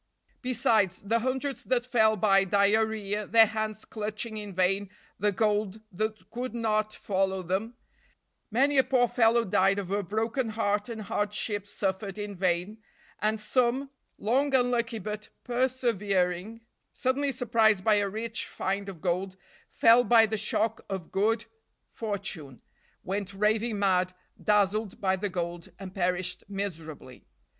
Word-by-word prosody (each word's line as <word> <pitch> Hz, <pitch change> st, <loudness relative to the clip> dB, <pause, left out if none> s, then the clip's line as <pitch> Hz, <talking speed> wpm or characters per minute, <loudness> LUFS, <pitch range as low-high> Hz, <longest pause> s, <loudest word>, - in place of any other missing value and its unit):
Besides, 230 Hz, -8 st, +1 dB
the 225 Hz, +3 st, +1 dB
hundreds 265 Hz, +3 st, -2 dB
that 245 Hz, -1 st, +1 dB
fell 220 Hz, -3 st, +3 dB
by 195 Hz, -1 st, +4 dB
diarrhea, 205 Hz, +1 st, +1 dB
their 225 Hz, 0 st, +7 dB
hands 215 Hz, 0 st, -3 dB
clutching 215 Hz, +1 st, -4 dB
in 210 Hz, -1 st, -6 dB
vain 190 Hz, +2 st, +1 dB, 0.3 s
the 210 Hz, 0 st, +2 dB
gold 210 Hz, 0 st, 0 dB
that 215 Hz, 0 st, -4 dB
could 245 Hz, +1 st, -4 dB
not 215 Hz, -2 st, 0 dB
follow 190 Hz, -2 st, -1 dB
them, 195 Hz, +7 st, -2 dB, 0.7 s
many 270 Hz, +5 st, +3 dB
a -, -, +6 dB
poor 255 Hz, -2 st, +3 dB
fellow 230 Hz, 0 st, +3 dB
died 195 Hz, +1 st, +3 dB
of 195 Hz, -2 st, -4 dB
a 205 Hz, +1 st, +1 dB
broken 225 Hz, +5 st, -1 dB
heart 210 Hz, -1 st, -1 dB
and 220 Hz, -2 st, -5 dB
hardships 205 Hz, 0 st, -1 dB
suffered 195 Hz, 0 st, -2 dB
in 205 Hz, -1 st, -5 dB
vain, 180 Hz, +3 st, -1 dB, 0.4 s
and 215 Hz, +1 st, +1 dB
some, 255 Hz, +4 st, 0 dB, 0.3 s
long 270 Hz, +6 st, +1 dB
unlucky 240 Hz, -2 st, +1 dB
but 210 Hz, -1 st, -6 dB
persevering, 225 Hz, -5 st, 0 dB, 0.3 s
suddenly 275 Hz, +2 st, 0 dB
surprised 225 Hz, -5 st, +2 dB
by 215 Hz, 0 st, +4 dB
a 200 Hz, -1 st, +1 dB
rich 225 Hz, +3 st, -4 dB
find 195 Hz, +1 st, -3 dB
of 175 Hz, -5 st, -10 dB
gold, 185 Hz, +1 st, -1 dB, 0.3 s
fell 230 Hz, +2 st, +5 dB
by 225 Hz, 0 st, +6 dB
the 220 Hz, 0 st, -2 dB
shock 215 Hz, +1 st, 0 dB
of 190 Hz, -4 st, -5 dB
good 220 Hz, +3 st, +1 dB, 0.5 s
fortune, 195 Hz, -, -5 dB, 0.4 s
went 195 Hz, +1 st, -4 dB
raving 215 Hz, +2 st, +1 dB
mad, 185 Hz, -2 st, +2 dB, 0.3 s
dazzled 210 Hz, 0 st, +1 dB
by 190 Hz, -1 st, +2 dB
the 200 Hz, +2 st, -3 dB
gold, 175 Hz, -1 st, -4 dB
and 190 Hz, -1 st, -9 dB
perished 180 Hz, -1 st, -1 dB
miserably. 165 Hz, -10 st, -6 dB
210 Hz, 140 wpm, -28 LUFS, 195-230 Hz, 0.7 s, their